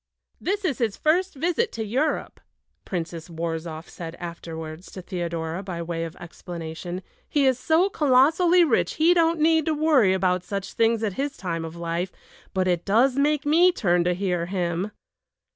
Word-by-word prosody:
"This 400 +2 -2
is 290 -9 0
his 225 -4 0
first 350 +3 +1
visit 350 - 0
to 220 -1 -3
Europe," 265 +9 -1 0.5
Princess 165 -2 -5
Worrzoff 165 -1 -4
said 165 -1 -8
afterwards 165 -1 -7
to 185 - -7
Theodora 170 -1 -3
by 180 -4 -5
way 165 0 -3
of 165 +1 -8
explanation. 175 +1 -7 0.3
"He 285 -2 +2
is 260 -1 +3
so 330 +6 +3
colossally 325 +3 +4
rich 280 -9 +1
he 325 +3 +5
don't 335 -1 +2
need 320 0 +3
to 315 - +2
worry 295 -11 +4
about 185 -1 +1
such 195 +1 -5
things 230 0 +2
at 205 -3 0
his 285 0 -3
time 170 -3 -3
of 165 0 -7
life; 170 +2 -3 0.4
but 185 -1 0
it 175 -2 +1
does 240 +6 +3
make 295 +1 +1
me 340 +5 +5
turn 175 - +2
to 180 0 +2
hear 180 -3 -1
him." 180 +1 -1
195 Hz, 170 wpm, -25 LUFS, -, 0.5 s, he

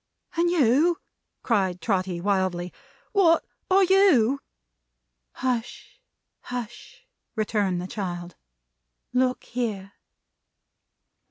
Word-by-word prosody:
"And 340 +1 +2
you," 320 +1 +3 0.5
said 190 -6 +1
Trotty, 185 -1 -1
wildly. 185 -2 0 0.4
"What 345 -5 +4 0.2
are 385 +1 +5
you?" 345 - +4 0.9
"Hush, 255 - -4 0.4
hush!" 245 - -8 0.3
returned 205 -4 0
the 180 - -4
child. 175 -3 -5 0.8
"Look 255 0 +1
here!" 210 -5 -4
225 Hz, 80 wpm, -25 LUFS, 190-290 Hz, 0.9 s, are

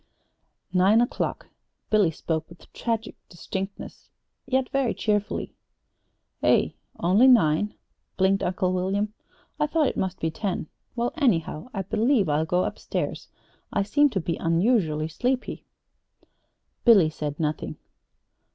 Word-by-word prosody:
"Nine 190 +4 +5
o'clock." 240 - -1 0.4
Billy 210 -5 +4
spoke 160 0 -3
with 170 - -17
tragic 225 -2 -2
distinctness, 190 +2 -6 0.4
yet 260 0 +1
very 275 -3 0
cheerfully. 210 -1 -1 0.9
"Eh? - - +4 0.3
Only 195 +9 +5
nine?" 210 -5 +4 0.4
blinked 195 +1 +3
Uncle 185 0 0
William. 195 +3 -1 0.5
"I 300 - +2
thought 310 0 +2
it - - 0
must 190 -2 -2
be 160 - -1
ten. 190 0 -3 0.3
Well, 240 0 -1
anyhow, 195 - +1
I 195 -4 -3
believe 220 - +2
I'll 150 +2 +1
go 180 +2 +2
up - - -4
stairs. - - -3 0.4
I 200 - +1
seem 290 +8 +3
to 210 -7 -1
be 165 -1 -2
unusually 165 -3 +1
sleepy." 250 +10 -2 1.2
Billy 200 -10 +6
said 150 -2 -5
nothing. 155 -1 -2
195 Hz, 125 wpm, -25 LUFS, 165-235 Hz, 1.2 s, Billy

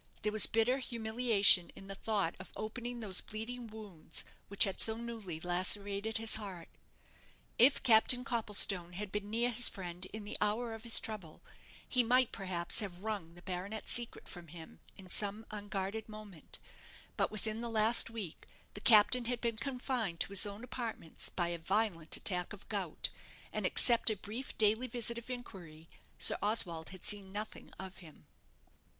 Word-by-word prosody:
There 210 - 0
was 215 0 +5
bitter 235 +4 +1
humiliation 220 -7 +5
in 195 - -11
the 195 - -7
thought 200 -4 -1
of 185 - -11
opening 240 +2 -6
those 195 -4 +2
bleeding 235 +3 -7
wounds 205 -8 -5 0.2
which 200 - +3
had 195 -2 -3
so 220 0 +5
newly 225 -8 -7
lacerated 200 +5 0
his 225 -1 +2
heart. 190 -6 -9 0.9
If 260 +5 +5
Captain 245 +1 +6
Copplestone 200 -7 +1
had 195 +2 -6
been 205 0 -4
near 235 +3 0
his 245 +1 +5
friend 180 -1 -7
in 215 +1 -8
the 205 - -3
hour 225 +3 -1
of 225 - -9
his 230 0 +4
trouble, 195 -8 -7 0.4
he 250 - +3
might, 250 +1 +2
perhaps, 180 -1 0
have 190 -4 -5
wrung 200 -7 -5
the 175 - -15
baronet's 190 +4 -3
secret 240 -1 +1
from 175 -2 -10
him 160 +1 -12 0.2
in 190 - -13
some 205 +4 -2
unguarded 205 +1 -5
moment; 215 -6 -10 0.6
but - - 0
within 215 +1 -4
the 235 - -4
last 225 +1 +5
week 215 -8 -8 0.3
the 205 - -10
Captain 235 +3 +5
had 245 0 -2
been 230 -2 -2
confined 250 -7 -3
to - - 0
his 200 +1 +4
own 205 +3 -9
apartments 230 -10 -4
by 175 -2 -2
a 170 -1 -4
violent 175 -2 +1
attack 180 -1 -2
of 205 - -13
gout; 195 -7 -3 0.4
and - - 0
except 235 -1 +3
a 215 - -1
brief 220 +7 -7
daily 220 +4 +2
visit 235 -1 -1
of 235 - -14
inquiry, 175 -10 -9 0.3
Sir - - +7
Oswald 180 -6 -1
had 185 -1 -11
seen 200 -2 -1
nothing 210 +2 -7
of 190 0 -8
him. 165 -4 -15
210 Hz, 170 wpm, -33 LUFS, 185-230 Hz, 0.9 s, Sir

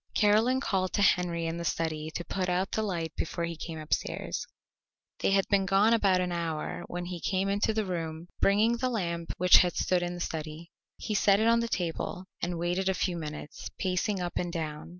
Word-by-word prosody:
Caroline 220 +5 +4
called 190 -8 -1
to - - +1
Henry 175 -3 +2
in 165 +1 -2
the 170 - -4
study 155 -1 -2
to 175 - -3
put 185 -2 -2
out 180 +2 0
the 220 - 0
light 170 -6 -3
before 170 +1 -2
he 170 0 -4
came 165 0 -6
upstairs. 155 0 -2 0.7
They - - +1
had 195 0 +3
been 195 -2 +2
gone 200 +4 +4
about 195 -5 +3
an 180 -1 -1
hour 165 -2 -3
when 175 0 -4
he 175 -1 -5
came 190 +2 0
into 205 +2 +1
the 215 -1 -1
room 165 -2 -4
bringing 215 +4 +3
the 255 +2 0
lamp 170 -7 -2
which 180 0 +7
had 180 -1 +3
stood 180 -1 +1
in 175 0 -3
the - - -7
study. 160 0 -5 0.3
He 215 - -4
set 200 -1 +4
it 220 - +2
on 230 0 +5
the 235 - 0
table 180 -2 -3 0.2
and 175 0 -2
waited 175 +3 0
a 190 - +1
few 180 -1 0
minutes, 150 -2 -6
pacing 190 +2 0
up 175 -1 -3
and 175 -1 -1
down. 155 -3 -4
180 Hz, 210 wpm, -29 LUFS, 170-195 Hz, 0.7 s, which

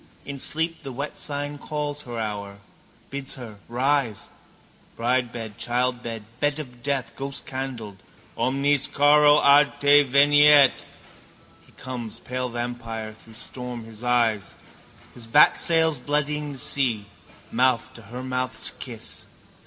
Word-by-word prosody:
In 140 -1 -6
sleep 160 +3 0
the 135 - -7
wet 140 +4 -5
sign 145 0 -4
calls 150 -1 -4
her 120 -3 -7
hour, 100 -2 -5 0.5
bids 140 -1 -3
her 115 -5 -10
rise. 130 -2 0 0.7
Bridebed, 120 -3 -2
childbed, 120 -2 -1
bed 145 0 +1
of 125 -5 -9
death, 140 -1 -2
ghostcandled. 130 -6 -5 0.4
Omnis 140 +1 +2
caro 145 +1 +5
ad 140 +1 +5
te 145 +1 +6
veniet. 145 0 +6 1.0
He - - -21
comes, 125 -4 -7
pale 125 0 -4
vampire, 115 -2 -5
through 110 0 -16
storm 125 0 -7
his 110 0 -12
eyes, 115 -4 +1 0.6
his 115 -2 -11
bat 115 - +6
sails 160 -4 +2
bloodying 150 +1 -1
the - - -8
sea, 125 -6 0 0.5
mouth 130 +1 +1
to 120 - -12
her 120 +4 -8
mouth's 130 0 -1
kiss. - - -7
130 Hz, 125 wpm, -24 LUFS, 120-145 Hz, 1.0 s, te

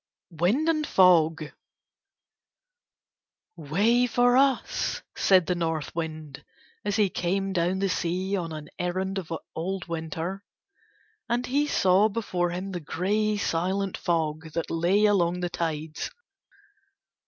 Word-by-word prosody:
WIND 185 - +1
AND 310 -2 +1
FOG 165 -4 +4 2.0
"Way 205 +11 +2
for 245 +1 +3
us," 270 0 +1
said 185 -3 +4
the 180 - 0
North 165 -3 -3
Wind 155 -4 -5 0.4
as 205 -1 -1
he 210 -2 +3
came 195 +2 -1
down 175 +1 +1
the 195 +1 0
sea 185 +2 -1
on 170 -4 -3
an 155 -1 -7
errand 190 +2 -1
of 165 -3 -9 0.2
old 185 +3 -3
Winter. 165 +3 -4 0.9
And 240 +2 0
he 285 +4 +1
saw 190 -2 +4
before 185 -5 -1
him 185 +3 -4
the 180 - -4
grey 205 +7 0
silent 190 +2 -1
fog 160 -2 -2
that 165 +1 -3
lay 180 +6 +3
along 180 -4 +2
the 175 - -1
tides. 155 -1 -3
180 Hz, 125 wpm, -26 LUFS, 165-200 Hz, 2.0 s, FOG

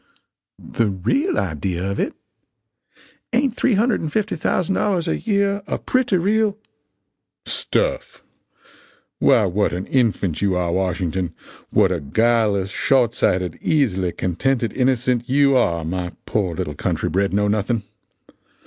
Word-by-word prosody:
"The 115 - -1
real 110 - 0
idea 90 +2 -2
of 100 - -4
it! - - -1 1.2
Ain't 250 0 +1
$350,000 200 - 0
a - - 0
year 200 -2 0
a - - -1
pretty 250 -6 +1
real 210 +3 +1 0.5
" - - -58
"Stuff! - - -2 1.0
Why 110 - +4
what 100 +1 0
an 90 +2 -3
infant 105 - 0
you 100 -2 +1
are, 90 -1 0
Washington 90 -1 -1 0.3
what - - +3
a 90 - -1
guileless, 105 +4 +1
short 125 -4 +2
sighted, 90 -7 0
easily 100 - +1
contented 115 +7 -1
innocent 125 -1 +1
you 140 0 +4
are, 85 -10 +1
my 90 +1 -3
poor 95 -6 -1
little 75 - -3
country - - -2
bred 100 +4 0
know 105 +1 +1
nothing! 105 +2 0
115 Hz, 120 wpm, -21 LUFS, -, 1.2 s, Why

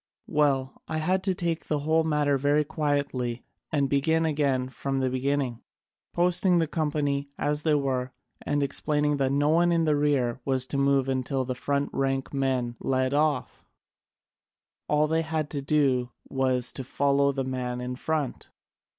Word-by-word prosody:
"Well, 135 -3 0
I 155 - -2
had 185 +4 +1
to 190 -2 +1
take 170 -2 -2
the 150 -2 0
whole 160 +2 +2
matter 150 -2 +1
very 145 +2 +2
quietly 140 -5 -2 0.3
and 140 -2 +2
begin 160 +4 +2
again 140 -4 +1
from 135 +2 -3
the 130 -1 0
beginning, 130 -2 -1 0.5
posting 175 +1 +2
the 165 - +3
company 145 -3 -1
as 150 0 0
they 155 -1 +2
were, 130 -3 -1 0.3
and 145 0 0
explaining 150 +1 0
that 135 -1 +1
no 145 +1 +2
one 170 +2 +4
in 165 -1 +2
the 155 -1 +3
rear 140 -4 +1
was 130 -1 0
to 140 - -2
move 140 -1 +3
until 130 0 -1
the 130 - -2
front 140 +3 -1
rank 135 0 -1
man 130 -3 -1
led 130 0 0
off: 150 -2 0 1.2
all 150 +1 +3
they 160 +1 +1
had 160 -2 -2
to 145 - -2
do 135 -4 +1 0.2
was 130 -2 0
to 135 - -5
follow 140 +2 +2
the 135 -1 -2
man 125 -1 -3
in 125 0 -4
front. 150 0 -3
140 Hz, 165 wpm, -27 LUFS, 130-150 Hz, 1.2 s, one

